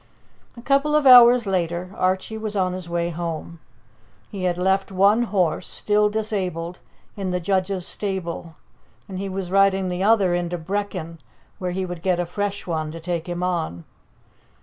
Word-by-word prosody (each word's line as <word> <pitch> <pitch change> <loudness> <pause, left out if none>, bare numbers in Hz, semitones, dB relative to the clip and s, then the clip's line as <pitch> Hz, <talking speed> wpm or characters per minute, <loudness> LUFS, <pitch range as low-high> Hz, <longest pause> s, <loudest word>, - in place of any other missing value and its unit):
A 235 - -10
couple 280 +3 +2
of 300 -1 +3
hours 245 -2 +8
later 180 -1 -2
Archie 185 +4 -1
was 215 -1 -4
on 185 -2 +1
his 180 -2 -7
way 170 0 -1
home. 170 0 -5 0.7
He 190 -3 -4
had 175 -1 0
left 190 +2 +1
one 200 +5 +4
horse, 185 -8 0
still 210 0 +1
disabled, 185 -6 -3 0.4
in 195 -2 -3
the 180 0 -1
judge's 185 0 0
stable, 175 -4 -4 0.5
and 190 -2 -6
he 195 0 -3
was 190 -1 -4
riding 195 -1 +3
the 180 +1 -3
other 200 -3 +3
into 175 0 -1
Brechin, 180 -2 -4 0.4
where 180 -2 -2
he 185 +1 -2
would 175 -2 -7
get 180 -1 +1
a 175 - 0
fresh 200 +3 -3
one 155 -3 -2
to 165 - -7
take 170 0 -4
him 175 0 -3
on. 165 - -2
185 Hz, 170 wpm, -23 LUFS, 175-200 Hz, 0.7 s, hours